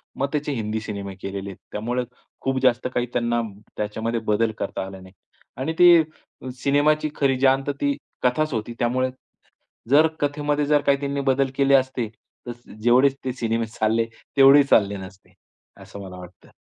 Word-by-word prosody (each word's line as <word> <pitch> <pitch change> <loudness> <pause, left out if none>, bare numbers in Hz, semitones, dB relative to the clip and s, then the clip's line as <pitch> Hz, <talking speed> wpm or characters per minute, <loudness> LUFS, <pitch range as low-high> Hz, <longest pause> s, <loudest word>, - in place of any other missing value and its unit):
मग 140 - -1
त्याचे 150 0 -1
हिंदी 110 -3 -2
सिनेमे 100 -3 -6
केलेले 100 0 -5
आहेत. 95 - -10
त्यामुळे 120 +4 -2 0.4
खूप 135 0 0
जास्त 125 -1 +3
काही 120 - 0
त्यांना 120 -1 0 0.4
त्याच्यामध्ये 110 +2 -2
बदल 110 +1 +1
करता 100 -1 -4
आला 95 0 -9
नाही 95 0 -15 0.4
आणि 145 +6 -2
ते 175 -2 +8 0.6
सिनेमाची 150 +2 +2
खरी 135 -2 +1
जान 135 0 +3
ती 140 0 -1 0.3
कथाच 155 +4 +1
होती. 115 +1 -3
त्यामुळे 130 +2 +1 0.8
जर 150 +4 +6
कथेमध्ये 145 0 0
जर 145 0 +3
काही 140 -1 +2
त्यांनी 140 0 -2
बदल 135 0 +1
केले 140 0 +3
असते, 130 -3 +1 0.4
तर - - -3 0.3
जेवढे 125 +4 +5 0.2
ते 130 - -1
सिनेमे 115 -2 -1
चालले, 110 +1 0 0.3
तेवढेही 135 +1 +8
चालले 100 -6 +3
नसते, 95 0 -12 0.5
असं 100 - -10
मला 95 -2 -9
वाटतं. 90 0 -14
125 Hz, 160 wpm, -23 LUFS, 110-140 Hz, 0.8 s, ते